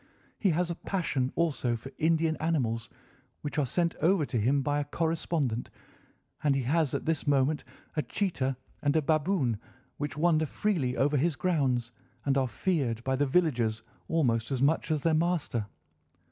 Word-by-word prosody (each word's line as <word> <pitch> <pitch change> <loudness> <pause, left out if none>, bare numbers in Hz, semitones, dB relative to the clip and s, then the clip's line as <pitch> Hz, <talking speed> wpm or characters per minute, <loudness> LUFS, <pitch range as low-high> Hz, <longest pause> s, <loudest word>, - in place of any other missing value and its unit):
He 200 - +3
has 175 +1 +1
a - - -3
passion 145 -9 -1
also 140 -8 +1
for 125 +4 -8
Indian 160 0 +2
animals, 125 -9 -1 0.5
which 150 +1 -2
are 140 - +1
sent 170 +5 0
over 175 -2 +3
to 120 - -1
him 135 +5 +2
by 145 +1 +1
a - - 0
correspondent, 155 -5 -1 0.7
and 145 -2 +3
he 135 - 0
has 150 +2 +1
at - - -3
this 160 -2 -1
moment 145 +1 +2 0.3
a 155 - +2
cheetah 140 -9 -1 0.2
and 145 +1 +1
a 160 - +4
baboon, 155 - +1 0.4
which 145 0 -4
wander 155 -1 +3
freely 150 -10 0
over 145 +2 +2
his 155 +3 +1
grounds 130 -10 0 0.3
and 140 -1 +2
are 135 -1 +2
feared 120 - -1
by 130 +1 +1
the 145 +2 +1
villagers 120 -9 +1 0.2
almost 120 -9 +1
as 135 -3 -1
much 145 +6 +2
as 155 -2 +1
their 165 +2 +2
master. 155 -9 0
145 Hz, 170 wpm, -29 LUFS, 130-165 Hz, 0.7 s, a